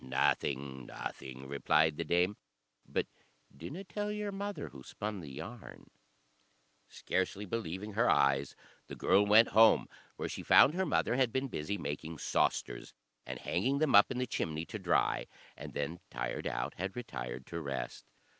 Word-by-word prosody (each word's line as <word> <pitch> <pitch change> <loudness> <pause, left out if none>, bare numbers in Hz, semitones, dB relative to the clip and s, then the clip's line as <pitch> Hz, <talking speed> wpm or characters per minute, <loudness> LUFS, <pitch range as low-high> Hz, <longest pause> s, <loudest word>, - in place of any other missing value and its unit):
"Nothing 65 0 0
nothing," 65 0 -7
replied 75 +3 +2
the 85 - -1
dame; 90 +5 +2 0.5
"but - - 0 0.5
dinna 140 - -7
tell 205 +3 -3
your 210 -1 -3
mother 200 +1 -4
who 70 - -12
spun 105 +8 -5
the 75 -5 -8
yarn." 110 - -9 1.0
Scarcely 95 +2 -2
believing 105 0 -4
her 115 +4 +3
eyes, 70 0 +3 0.3
the - - -7
girl 100 - +4
went 110 +3 +7
home, 110 +1 +6 0.3
where - - -3
she - - -5
found 145 - +7
her 190 +1 0
mother 125 -4 +1
had 130 -3 +3
been 130 +2 -1
busy 100 +1 -3
making 80 +2 -5
sausters, - - -1 0.3
and 65 0 -4
hanging 135 +2 0
them 155 0 +2
up 100 - +8
in 125 - -3
the 125 - 0
chimney 80 -8 -2
to - - -6
dry, - - +1 0.3
and - - -9
then, 75 +4 -3
tired - - -3
out, - - -2
had 95 +2 -3
retired 65 - -6
to 85 0 -5
rest. 70 -3 -5
95 Hz, 160 wpm, -33 LUFS, -, 1.0 s, up